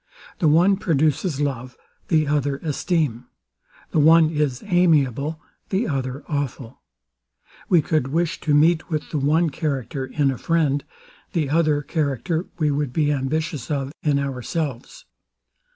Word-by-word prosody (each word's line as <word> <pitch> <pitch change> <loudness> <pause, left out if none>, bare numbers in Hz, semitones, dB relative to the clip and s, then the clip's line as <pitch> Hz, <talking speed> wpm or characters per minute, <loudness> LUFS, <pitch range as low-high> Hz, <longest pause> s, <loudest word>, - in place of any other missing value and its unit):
The 165 - +2
one 175 +6 +4
produces 155 -3 0
love; 130 -3 -3 0.3
the 155 -3 +2
other 145 -1 0
esteem: 150 -6 -1 0.6
The - - +2
one 160 +1 +6
is 150 -5 -1
amiable; 155 - +2 0.3
the 205 +5 0
other 135 -2 -3
awful: 140 -4 -4 0.9
We 170 -4 +4
could 155 -5 0
wish 165 +4 -1
to 150 -2 +2
meet 160 +3 +3
with 155 -3 -3
the 150 - -1
one 155 +4 +2
character 135 -3 -3
in 140 0 +1
a 130 - -6
friend; 150 -4 +1 0.5
the 155 -6 0
other 155 -2 +2
character 155 - -2
we 155 -3 +1
would 145 -2 -1
be 150 +2 +1
ambitious 145 0 -2
of 140 -2 -2
in 145 -2 +1
ourselves. 140 0 -4
150 Hz, 135 wpm, -22 LUFS, 135-160 Hz, 0.9 s, one